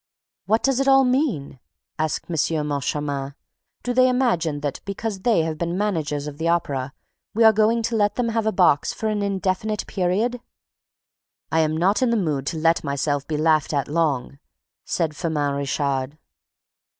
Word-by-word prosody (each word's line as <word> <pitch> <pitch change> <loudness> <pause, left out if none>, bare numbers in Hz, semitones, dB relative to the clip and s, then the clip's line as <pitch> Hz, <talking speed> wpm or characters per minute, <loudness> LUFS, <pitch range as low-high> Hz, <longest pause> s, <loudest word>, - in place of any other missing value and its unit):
"What 220 +2 +2
does 270 -1 +2
it 275 - +1
all 270 0 +6
mean?" 250 - 0 0.4
asked 155 -1 -1
M. 160 -2 0
Moncharmin. 140 -1 -2 0.5
"Do 245 - -1
they 255 +1 +5
imagine 175 - +1
that, 145 -1 -3
because 200 0 -4
they 200 -4 +2
have 160 -1 -3
been 170 +1 -2
managers 155 -8 -1
of 150 0 -8
the 165 - -1
Opera, 140 -6 0 0.4
we 230 - +4
are 220 -1 +7
going 220 +2 +2
to 230 +1 -1
let 205 -1 +2
them 245 -2 0
have 225 -1 -1
a - - +3
box 180 -7 +3
for 220 - -2
an 210 -1 -1
indefinite 200 +1 -1
period?" 215 +6 -1 1.1
"I 160 - +2
am 155 0 +1
not 190 +7 +2
in 255 - +3
the 235 - +2
mood 150 -8 -1
to 165 - -2
let 165 +1 +2
myself 140 -1 -1
be 155 - -2
laughed 155 -1 +2
at 140 0 0
long," 145 -4 -1 0.5
said 160 -3 -1
Firmin 150 -4 -1
Richard. 140 0 -2
165 Hz, 175 wpm, -23 LUFS, 145-220 Hz, 1.1 s, are